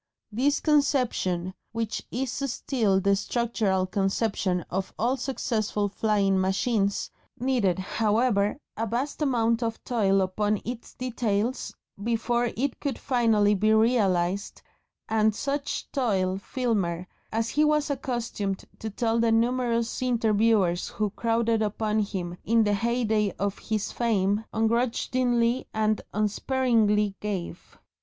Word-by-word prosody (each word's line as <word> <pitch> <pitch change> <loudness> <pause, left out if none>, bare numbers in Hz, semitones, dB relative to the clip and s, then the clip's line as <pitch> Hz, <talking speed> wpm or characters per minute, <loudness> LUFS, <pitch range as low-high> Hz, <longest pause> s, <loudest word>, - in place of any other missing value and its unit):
This 270 +7 +1
conception, 250 - +1 0.2
which 225 -1 -3
is 255 0 -2
still 240 -7 0
the 200 +1 +3
structural 205 -3 0
conception 195 -1 0
of 190 +1 -2
all 245 +4 +1
successful 220 -6 -1
flying 200 -2 +1
machines, 200 +1 0 0.3
needed, 240 -8 +1
however, 210 +2 +1 0.2
a 225 +1 -2
vast 255 +8 -3
amount 235 -4 +2
of 225 -1 -3
toil 195 -5 +2
upon 205 +2 0
its 240 0 -6
details 240 -2 -2 0.3
before 235 +1 +1
it 270 +1 -1
could 280 -5 -2
actually 220 -4 +4
be 215 +2 +2
realised, 200 -5 +1 0.4
and 220 -1 +2
such 280 +3 -3
toil 190 -8 0
Filmer 200 -8 -1 0.3
as 225 +1 0
he 300 - +2
was 300 -1 +2
accustomed 240 -7 -3
to 220 - -4
tell 225 +2 0
the 230 0 +3
numerous 235 0 +1
interviewers 220 -6 +2
who 210 -1 -2
crowded 230 0 +1
upon 215 0 0
him 185 -4 -3
in 230 +1 +3
the 205 -1 +2
heyday 220 -2 +1
of 200 0 -2
his 215 -2 -2
fame 210 -2 +1
"ungrudgingly 235 +1 +1
and 215 0 +1
unsparingly 215 -1 +1
gave." 190 -4 -5
220 Hz, 120 wpm, -26 LUFS, 200-240 Hz, 0.4 s, actually